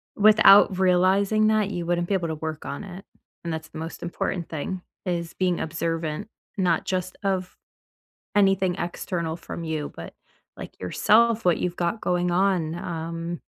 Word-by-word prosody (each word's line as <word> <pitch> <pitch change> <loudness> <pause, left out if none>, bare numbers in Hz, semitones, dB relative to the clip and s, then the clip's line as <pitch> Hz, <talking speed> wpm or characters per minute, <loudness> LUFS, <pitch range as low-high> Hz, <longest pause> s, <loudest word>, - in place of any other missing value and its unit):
without 205 -2 +7
realizing 190 +3 +3
that, 215 -2 +2
you 175 -3 -3
wouldn't 175 0 0
be 200 - -1
able 175 -3 -1
to 160 - -2
work 155 0 -5
on 140 - -5
it. 190 -1 -10 0.4
And 170 -1 -3
that's 160 0 -6
the - - -10
most 165 +1 -7
important 170 0 -3
thing, 175 +4 -4 0.2
is 170 -2 -2
being 180 -2 0
observant, 165 +1 -3 0.3
not 175 -4 +1
just 185 -1 -2
of 190 -2 -2 0.8
anything 195 -3 +3
external 170 -2 -3
from 170 - -7
you, 155 -2 -3
but, - - -9 0.4
like, - - -10
yourself, 225 - +3
what 175 -2 +4
you've 175 -1 -2
got 175 +6 -1
going 180 0 0
on, 175 -3 +1
um 165 0 -5
175 Hz, 160 wpm, -25 LUFS, 165-195 Hz, 0.8 s, without